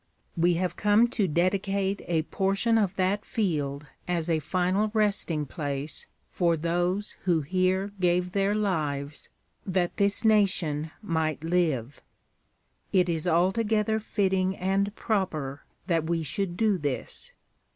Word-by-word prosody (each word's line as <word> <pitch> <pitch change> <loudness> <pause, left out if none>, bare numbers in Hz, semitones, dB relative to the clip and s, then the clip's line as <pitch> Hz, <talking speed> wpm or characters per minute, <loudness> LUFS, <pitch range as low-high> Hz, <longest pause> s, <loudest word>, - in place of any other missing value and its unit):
We 170 +1 +3
have 180 +1 -1
come 210 +3 +4
to 215 -5 0
dedicate 195 +4 0
a 165 -2 +1
portion 195 +6 +1
of 195 -3 0
that 195 +2 0
field 150 - -2 0.2
as 170 -1 0
a 160 - +2
final 185 +6 0
resting 195 -8 +1
place 145 0 -4 0.2
for 170 -2 +2
those 175 +5 -1
who 170 -4 +3
here 185 +5 0
gave 180 0 +1
their 200 +1 +1
lives 150 -8 -2 0.3
that 185 -2 -1
this 200 +2 +3
nation 185 -8 +2
might 160 -4 -1
live. 160 -7 0 0.9
It 180 -3 +3
is 165 0 -1
altogether 210 +5 +2
fitting 190 -3 0
and 195 +2 0
proper 155 - -2 0.2
that 165 -3 0
we 165 -1 0
should 175 +4 -2
do 215 -4 +2
this. 145 -3 -3
180 Hz, 130 wpm, -27 LUFS, 160-200 Hz, 0.9 s, come